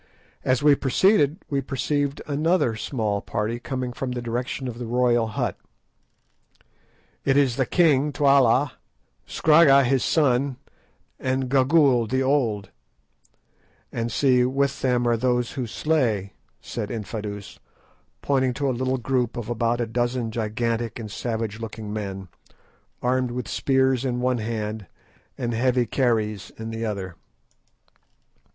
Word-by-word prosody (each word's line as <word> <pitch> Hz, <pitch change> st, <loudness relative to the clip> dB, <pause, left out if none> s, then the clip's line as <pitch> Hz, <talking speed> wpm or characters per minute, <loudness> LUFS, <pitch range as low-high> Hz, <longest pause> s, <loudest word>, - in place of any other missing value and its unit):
As 130 Hz, +2 st, +1 dB
we 150 Hz, -1 st, +7 dB
proceeded 150 Hz, -, +3 dB
we 140 Hz, -1 st, -1 dB
perceived 140 Hz, +1 st, -2 dB
another 155 Hz, -4 st, +1 dB
small 105 Hz, -3 st, -2 dB
party 115 Hz, +2 st, -3 dB
coming 125 Hz, -1 st, -4 dB
from 125 Hz, 0 st, -4 dB
the 120 Hz, -, -4 dB
direction 125 Hz, +3 st, -3 dB
of 120 Hz, -1 st, -6 dB
the 120 Hz, -, -5 dB
royal 120 Hz, -1 st, +2 dB
hut. 110 Hz, -, -3 dB, 1.6 s
"It 135 Hz, 0 st, +2 dB
is 135 Hz, -4 st, +3 dB
the 130 Hz, -1 st, 0 dB
king 150 Hz, -5 st, +3 dB
Twala, 140 Hz, -1 st, +4 dB, 0.6 s
Scragga 150 Hz, -3 st, +5 dB
his 130 Hz, 0 st, +1 dB
son, 135 Hz, -3 st, +2 dB, 0.6 s
and 130 Hz, 0 st, -1 dB
Gagool 135 Hz, -3 st, +4 dB
the 130 Hz, +1 st, +1 dB
old; 115 Hz, -8 st, 0 dB, 1.2 s
and 115 Hz, 0 st, -3 dB
see, 125 Hz, 0 st, +3 dB
with 135 Hz, +2 st, 0 dB
them 125 Hz, -2 st, +1 dB
are 120 Hz, -1 st, +2 dB
those 125 Hz, 0 st, 0 dB
who 130 Hz, -3 st, -4 dB
slay," 115 Hz, -8 st, 0 dB, 0.3 s
said 105 Hz, -3 st, -5 dB
Infadoos, 105 Hz, -2 st, -6 dB, 0.6 s
pointing 130 Hz, -3 st, +1 dB
to 140 Hz, +1 st, -1 dB
a -, -, -1 dB
little 130 Hz, +2 st, -1 dB
group 125 Hz, -1 st, -1 dB
of 120 Hz, -1 st, -4 dB
about 120 Hz, 0 st, 0 dB
a 120 Hz, -, 0 dB
dozen 120 Hz, 0 st, -1 dB
gigantic 115 Hz, +1 st, -2 dB
and 110 Hz, -3 st, -7 dB
savage 110 Hz, -1 st, -3 dB
looking 110 Hz, -2 st, -6 dB
men, 95 Hz, -3 st, -5 dB, 0.8 s
armed 125 Hz, 0 st, +1 dB
with 125 Hz, +1 st, -4 dB
spears 130 Hz, -2 st, +1 dB
in 125 Hz, -2 st, -1 dB
one 125 Hz, -1 st, +1 dB
hand 110 Hz, -2 st, -4 dB, 0.5 s
and 120 Hz, -1 st, -2 dB
heavy 125 Hz, +1 st, +2 dB
kerries 110 Hz, -4 st, 0 dB
in 110 Hz, 0 st, -6 dB
the 115 Hz, 0 st, -4 dB
other. 95 Hz, -5 st, -4 dB
125 Hz, 135 wpm, -24 LUFS, 115-135 Hz, 1.6 s, we